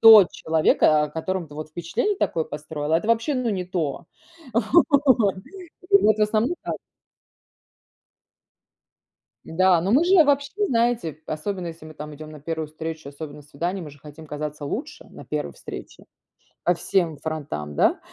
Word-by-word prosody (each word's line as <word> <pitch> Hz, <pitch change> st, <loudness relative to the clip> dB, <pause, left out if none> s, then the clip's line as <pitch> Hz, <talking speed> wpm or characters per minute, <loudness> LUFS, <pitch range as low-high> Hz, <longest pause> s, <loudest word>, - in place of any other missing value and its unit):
то 220 Hz, -3 st, +10 dB
человека, 155 Hz, -1 st, +3 dB
о 150 Hz, -, -6 dB
котором 170 Hz, +2 st, -3 dB
ты 145 Hz, -, -12 dB
вот 155 Hz, +1 st, -6 dB
впечатление 175 Hz, -, -1 dB
такое 165 Hz, -, 0 dB
построила. 150 Hz, 0 st, -3 dB
Это 170 Hz, +7 st, +1 dB
вообще, 230 Hz, +6 st, +2 dB
ну, 250 Hz, -3 st, 0 dB
не 185 Hz, -3 st, -2 dB
то! 170 Hz, -3 st, -3 dB, 0.5 s
Вот. 265 Hz, -, +4 dB, 0.6 s
Ну, 400 Hz, 0 st, +6 dB
вот, 215 Hz, 0 st, +5 dB
в -, -, +3 dB
основном, 215 Hz, +9 st, +2 dB
так. -, -, -3 dB, 2.7 s
Да, 185 Hz, +1 st, +3 dB
но 195 Hz, +4 st, +1 dB
мы 285 Hz, +7 st, +5 dB
же 370 Hz, +1 st, +5 dB
обобщим, 290 Hz, +7 st, +3 dB
знаете, 230 Hz, -, 0 dB
особенно 180 Hz, +4 st, -3 dB
если 165 Hz, -1 st, -8 dB
мы 155 Hz, -, -10 dB
там 150 Hz, 0 st, -8 dB
идём 155 Hz, +1 st, -10 dB
на 150 Hz, -, -11 dB
1 160 Hz, +1 st, -3 dB
встречу, 155 Hz, -1 st, -6 dB
особенно- 145 Hz, 0 st, -8 dB
на 150 Hz, -, -12 dB
свидание, 170 Hz, +6 st, -4 dB
мы 150 Hz, -, -8 dB
же 145 Hz, -, -16 dB
хотим 150 Hz, +2 st, -12 dB
казаться 150 Hz, 0 st, -5 dB
лучше 140 Hz, -, -5 dB
на -, -, -11 dB
1 70 Hz, -, -3 dB
встрече. -, -, -10 dB, 0.6 s
По 175 Hz, -, +4 dB
всем 170 Hz, -3 st, 0 dB
фронтам, 145 Hz, -, -5 dB
да? -, -, +3 dB
165 Hz, 160 wpm, -24 LUFS, 150-215 Hz, 2.7 s, то